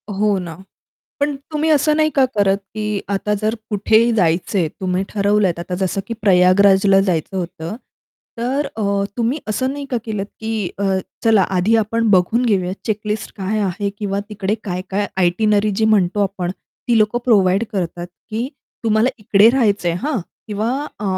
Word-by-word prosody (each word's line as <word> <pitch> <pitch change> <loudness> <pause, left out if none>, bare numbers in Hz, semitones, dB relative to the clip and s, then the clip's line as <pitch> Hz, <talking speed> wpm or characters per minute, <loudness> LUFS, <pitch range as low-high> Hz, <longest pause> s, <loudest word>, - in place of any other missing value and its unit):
हो 205 0 +1
ना. 170 -3 -7 0.7
पण 285 0 +1 0.2
तुम्ही 310 +1 0
असं 300 0 +3
नाही 310 0 +3
का 270 - +5
करत, 200 -2 +2 0.2
की 210 -2 -2
आता 200 +1 0
जर 215 +1 0 0.2
कुठेही 220 +3 +3
जायचं 180 0 +1
आहे 170 -3 +1
तुम्ही 185 +3 -2
ठरवलत 200 -3 +1
आता 175 +1 -4
जसं 190 +1 -1
की 230 - -4
प्रयागराजला 195 +1 +5
जायचं 185 -1 -1
होतं. 175 +1 -5 0.6
तर 265 +5 -1
अ, 200 -2 0
तुम्ही 240 +5 0
असं 260 +5 -1
नाही 285 0 -6
का 250 - 0
केलत, 210 -3 -3
की 220 -4 -2
अ, 200 - -1 0.4
चला 220 -3 +5
आधी 190 +6 +2
आपण 225 +1 +1
बघून 200 +6 +3
घेऊयात 185 -4 +1
चेक 215 -2 -1
लिस्ट 210 +1 -3
काय 200 +2 -2
आहे 200 +1 -1
किंवा 200 -1 -2
तिकडे 205 -1 -2
काय-काय 190 +1 -2
आयटिनरी 205 +3 +2
जी 220 - +2
म्हणतो 205 -2 +2
आपण. 190 -3 -2 0.4
ती 235 - +4
लोक 215 +2 +2
प्रोव्हाईड 200 -3 +3
करतात, 175 -3 -3 0.2
की 230 +4 -2 0.4
तुम्हाला 220 +2 +3
इकडे 210 0 +5
राहायचं 210 -8 +1
आहे, 170 - 0
हां. 285 +2 -1 0.3
किंवा 215 +1 -2 0.3
अ, - - -4
205 Hz, 165 wpm, -19 LUFS, 190-225 Hz, 0.7 s, का